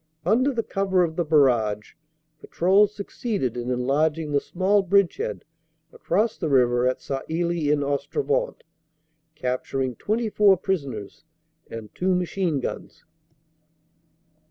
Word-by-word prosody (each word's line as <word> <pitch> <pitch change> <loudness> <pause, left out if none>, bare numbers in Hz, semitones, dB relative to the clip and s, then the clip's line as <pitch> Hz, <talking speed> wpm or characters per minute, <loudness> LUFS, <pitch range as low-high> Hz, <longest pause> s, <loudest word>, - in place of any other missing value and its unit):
Under 245 +9 +3
the 235 -3 -2
cover 195 -3 +1
of 160 -2 -2
the 175 - 0
barrage, 120 -9 +2 0.5
patrols 200 +6 +2
succeeded 200 - -3
in 120 0 -4
enlarging 150 +5 0
the 145 - +3
small 195 +3 +1
bridgehead 190 - 0 0.5
across 210 +6 -1
the 160 - -1
river 125 -2 +3
at 130 - 0
Sailly 160 +2 -1
en 145 -1 +1
Ostrevent, 450 - -1 0.7
capturing 130 -2 -2
24 210 -3 +2
prisoners 145 - -4 0.5
and 110 -2 -8
two 185 0 +1
machine 180 -3 -1
guns. 125 - -7
165 Hz, 110 wpm, -24 LUFS, 135-195 Hz, 0.7 s, Under